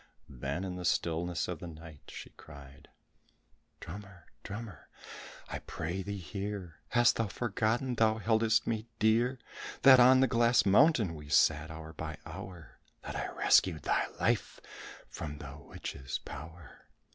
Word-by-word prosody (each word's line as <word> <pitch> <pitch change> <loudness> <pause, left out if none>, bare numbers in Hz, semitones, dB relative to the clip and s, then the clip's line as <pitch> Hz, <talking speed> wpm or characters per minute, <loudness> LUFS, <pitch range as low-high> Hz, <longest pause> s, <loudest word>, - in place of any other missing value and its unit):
Then 70 +7 -4
in 90 -1 -4
the 90 - -6
stillness 85 0 0
of - - -4
the 85 - -7
night, 80 -2 -12
she - - -9
cried, 70 -1 -14 0.9
"Drummer, 95 -1 -10 0.2
drummer, 105 0 -8 0.6
I - - -5
pray 85 +4 -4
thee 100 +1 -5
hear! 95 -1 -6
Hast 120 -1 +4
thou 115 - 0
forgotten 115 +4 -1
thy 110 -2 +3
heldest 110 0 +2
me 110 -1 -2
dear? 115 +4 +2 0.5
That 130 -2 +9
on 130 +1 +7
the 135 - +5
glass 120 +1 +3
mountain 110 - +4
we 75 -2 -10
sat 75 +1 +3
hour 80 0 -9
by 80 -1 -6
hour? 90 -4 -10 0.2
That - - -6
I - - -2
rescued 85 -5 +3
thy - - +1
life - - 0 0.5
from 75 -1 -7
the 70 -1 -9
witch's 70 -2 -6
power? 80 -1 -11
95 Hz, 145 wpm, -31 LUFS, 80-110 Hz, 0.9 s, That